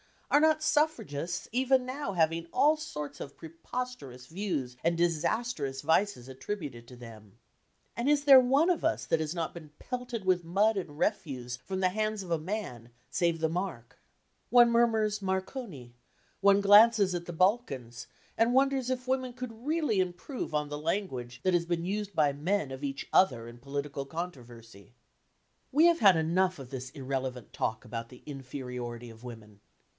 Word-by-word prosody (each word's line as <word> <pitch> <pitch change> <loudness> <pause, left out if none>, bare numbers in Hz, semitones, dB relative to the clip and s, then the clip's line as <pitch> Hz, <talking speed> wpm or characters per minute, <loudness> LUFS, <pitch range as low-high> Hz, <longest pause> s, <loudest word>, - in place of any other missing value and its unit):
Are 290 - +6
not 310 0 +3
suffragists 175 - 0
even 260 +1 +2
now 255 -4 -4
having 165 -1 +1
all 290 +5 +5
sorts 150 - -6
of 140 - -8
preposterous 165 - -7
views 160 -9 -3
and 170 0 +1
disastrous 170 - -1
vices 160 -3 +1
attributed 130 - -6
to 125 - -12
them? 110 -3 -13 0.6
And 240 +4 0
is 295 -1 +3
there 275 -2 +9
one 270 +7 +3
of 340 - -1
us 320 - 0
that 165 - +1
has 155 +2 -3
not 165 -2 -2
been 155 -4 -11
pelted 245 -4 -5
with 180 -2 +2
mud 205 +5 +2
and 165 -6 -5
refuse 130 - -2
from 190 +8 -5
the 185 - +3
hands 215 +1 -2
of 175 - -9
a 165 - +1
man 155 - -5 0.2
(save 170 0 0
the 160 - +2
mark)? 165 -9 -5 0.5
One 240 -1 +6
murmurs 220 -3 +2
"Marconi," 190 - -4 0.5
one 200 0 +5
glances 205 -1 +6
at 175 -1 -3
the 175 - -6
Balkans, 160 - 0 0.3
and 230 +2 +3
wonders 270 -1 +2
if 255 0 -3
women 260 -1 0
could 245 0 -8
really 300 -10 +1
improve 185 - -3
on 150 -1 -1
the 150 0 -4
language 130 -8 -3
that 185 - +2
has 170 -1 +2
been 170 0 -2
used 205 0 -3
by 150 -2 +3
men 155 0 -1
of 130 +2 -5
each 135 -1 -4
other 120 -11 +3
in 120 0 -11
political 140 +1 -4
controversy. 120 - -8 0.8
We 300 +5 +5
have 340 -1 +3
had 195 -4 +7
enough 180 +3 +1
of 135 -3 -10
this 130 -1 -5
irrelevant 130 -3 -4
talk 110 - -2
about 115 0 -5
the 125 - -15
inferiority 125 -4 -6
of 115 +2 -14
women. 110 -4 -11
175 Hz, 170 wpm, -30 LUFS, 135-225 Hz, 0.8 s, there